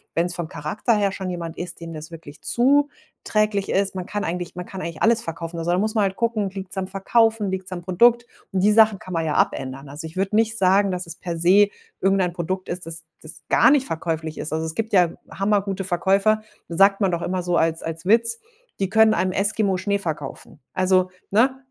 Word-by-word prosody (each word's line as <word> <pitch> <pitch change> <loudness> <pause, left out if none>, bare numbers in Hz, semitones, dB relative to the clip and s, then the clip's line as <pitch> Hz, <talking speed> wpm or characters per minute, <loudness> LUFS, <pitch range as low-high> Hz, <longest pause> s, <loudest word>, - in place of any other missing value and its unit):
wenn's 175 +1 0
vom 170 -3 -4
Charakter 165 - -2
her 200 -2 +1
schon 190 -2 -5
jemand 170 -2 -5
ist, 175 - -6
dem 165 - -7
das 155 +1 -8
wirklich 160 -3 -12
zuträglich 240 -6 0
ist, 195 0 0
man 185 - -4
kann 205 +2 -4
eigentlich 175 +1 -4
man 180 0 -6
kann 190 0 -8
eigentlich 165 -2 -6
alles 230 0 +4
verkaufen. 165 +1 -6
Also, 165 +1 -3
da 180 - +2
muss 215 +3 0
man 215 - +2
halt 190 -1 -1
gucken: 220 -4 -1
Liegt's 195 0 -7
am 190 -1 -2
Verkaufen, 215 +2 +1
liegt's 190 0 -5
am 175 -1 -5
Produkt? 235 +6 +3 0.3
Und 190 -2 0
die 210 - +5
Sachen 215 -2 +5
kann 185 - -9
man 165 -1 -1
ja 150 - -1
abändern. 135 +1 -1
Also, 150 +3 -7
ich 160 - -13
würde 195 +2 -1
nicht 225 0 +2
sagen, 195 +1 +4
dass 180 -1 -3
es 170 0 -6
per 170 -1 -5
se 190 +5 +5 0.3
irgendein 190 -2 +2
Produkt 185 +2 -4
ist, 175 -1 -4
das 165 -1 -4 0.2
das 155 - -8
gar - - +5
nicht 275 -2 +3
verkäuflich 160 -1 -3
ist. 155 - -4
Also, 160 +1 -1
es 160 - -3
gibt 225 -1 -3
ja 180 -3 +5 0.2
hammer 200 +1 +1
gute 195 -1 -4
Verkäufer, 195 +4 +2 0.3
sagt 195 +4 +4
man 195 -2 +2
doch 170 0 -2
immer 185 0 -2
so 175 0 0
als 165 0 +1
als 165 +1 -6
Witz: 230 +3 +5 0.4
„Die 195 - 0
können 220 +2 +5
einem 185 -3 0
Eskimo 200 -1 +1
Schnee 200 +2 0
verkaufen.“ 155 -6 -6
Also, 185 0 +2 0.2
ne? 260 +5 +2
190 Hz, 220 wpm, -22 LUFS, 170-210 Hz, 0.4 s, die